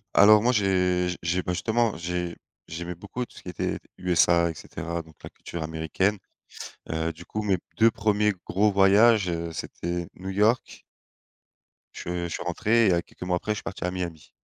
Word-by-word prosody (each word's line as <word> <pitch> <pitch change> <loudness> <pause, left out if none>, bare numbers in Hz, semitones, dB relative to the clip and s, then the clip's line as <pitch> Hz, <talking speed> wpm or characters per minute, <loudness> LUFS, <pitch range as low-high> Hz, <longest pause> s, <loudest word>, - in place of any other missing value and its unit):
Alors 105 +1 +7
moi 125 - +4
j'ai 90 -4 +2 0.2
j'ai 85 +2 +1
bah, 90 - -2
justement 110 +4 0
j'ai 90 0 -3 0.3
j'aimais 85 +2 -5
beaucoup 100 +8 -5
tout - - -22
ce - - -10
qui - - -7
était 90 - -2 0.2
USA 85 -1 +3
et - - -8
cetera, 85 +2 -5
donc 80 -1 -18
la - - -7
culture 85 -1 -7
américaine, 80 +6 -1 0.7
heu, 80 +1 -1
du 85 +2 -13
coup 110 +5 -4
mes 95 -3 +2 0.2
deux 115 +1 +6
1ers 105 -1 +2
gros 105 +3 +2
voyages, 100 +1 +5
heu, 85 -1 -3
c'était 85 +2 -4
New 95 +1 -7
York 105 +6 +1 1.1
je - - -7 0.2
je 85 - -6
suis - - -4
rentré 110 +6 +2
et 95 - +4
à 85 - +2
quelques - - -25
mois 90 0 0
après 105 - -3
je - - -6
suis - - -7
parti 95 - -6
à 90 - -1
Miami. 85 -4 -5
90 Hz, 190 wpm, -26 LUFS, 85-105 Hz, 1.1 s, Alors